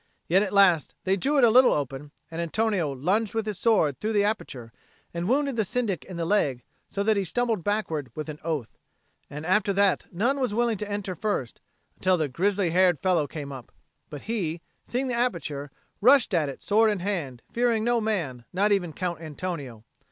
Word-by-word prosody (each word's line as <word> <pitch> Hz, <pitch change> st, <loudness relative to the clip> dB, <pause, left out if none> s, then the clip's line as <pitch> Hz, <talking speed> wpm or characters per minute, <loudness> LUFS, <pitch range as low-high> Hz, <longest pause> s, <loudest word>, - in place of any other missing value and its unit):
Yet 185 Hz, +4 st, +4 dB
at 205 Hz, -2 st, -1 dB
last 185 Hz, -7 st, +4 dB
they 190 Hz, +1 st, +2 dB
drew 280 Hz, +10 st, 0 dB
it 270 Hz, -, +4 dB
a 235 Hz, -, +7 dB
little 255 Hz, +3 st, +6 dB
open; 140 Hz, 0 st, -3 dB, 0.2 s
and 165 Hz, +1 st, -3 dB
Antonio 185 Hz, -2 st, 0 dB
lunged 190 Hz, -, 0 dB
with 225 Hz, -1 st, 0 dB
his 210 Hz, -4 st, -4 dB
sword 170 Hz, -, +2 dB
through 220 Hz, +1 st, -2 dB
the 205 Hz, -1 st, +3 dB
aperture 135 Hz, -, -3 dB, 0.4 s
and 170 Hz, +3 st, -2 dB
wounded 275 Hz, -1 st, +1 dB
the 220 Hz, -, +3 dB
Syndic 205 Hz, -, -2 dB
in 185 Hz, -, -8 dB
the 170 Hz, -, -2 dB
leg, 145 Hz, -, +1 dB, 0.2 s
so 200 Hz, -, -2 dB
that 215 Hz, 0 st, +2 dB
he 200 Hz, -, +1 dB
stumbled 225 Hz, -1 st, -1 dB
backwards 165 Hz, -, -1 dB
with 155 Hz, 0 st, -5 dB
an 150 Hz, -1 st, -7 dB
oath. 155 Hz, -8 st, -4 dB, 0.5 s
And 150 Hz, +2 st, -7 dB
after 200 Hz, +3 st, +2 dB
that 200 Hz, -1 st, +1 dB
none 240 Hz, +10 st, 0 dB
was 250 Hz, -6 st, -1 dB
willing 235 Hz, -3 st, +1 dB
to 210 Hz, -, -4 dB
enter 205 Hz, -2 st, -3 dB
first, 175 Hz, -, -3 dB, 0.4 s
until 185 Hz, -1 st, +2 dB
the 155 Hz, -3 st, 0 dB
grizzly 185 Hz, +5 st, 0 dB
haired 180 Hz, -3 st, +4 dB
fellow 170 Hz, -4 st, +1 dB
came 145 Hz, -2 st, -7 dB
up; 130 Hz, -4 st, -9 dB, 0.4 s
but 145 Hz, -, -8 dB
he, 175 Hz, -8 st, -2 dB, 0.2 s
seeing 255 Hz, +2 st, -2 dB
the 250 Hz, -, -2 dB
aperture, 170 Hz, -, -2 dB, 0.3 s
rushed 255 Hz, -1 st, +5 dB
at 155 Hz, -5 st, +2 dB
it 135 Hz, -, -9 dB
sword 220 Hz, +2 st, +4 dB
in 210 Hz, -, 0 dB
hand, 165 Hz, -11 st, -3 dB
fearing 235 Hz, -2 st, +1 dB
no 240 Hz, 0 st, +2 dB
man, 165 Hz, -, -2 dB
not 200 Hz, +3 st, +2 dB
even 180 Hz, -5 st, +1 dB
Count 175 Hz, -2 st, -3 dB
Antonio. 150 Hz, -7 st, -6 dB
190 Hz, 200 wpm, -26 LUFS, 155-215 Hz, 0.5 s, a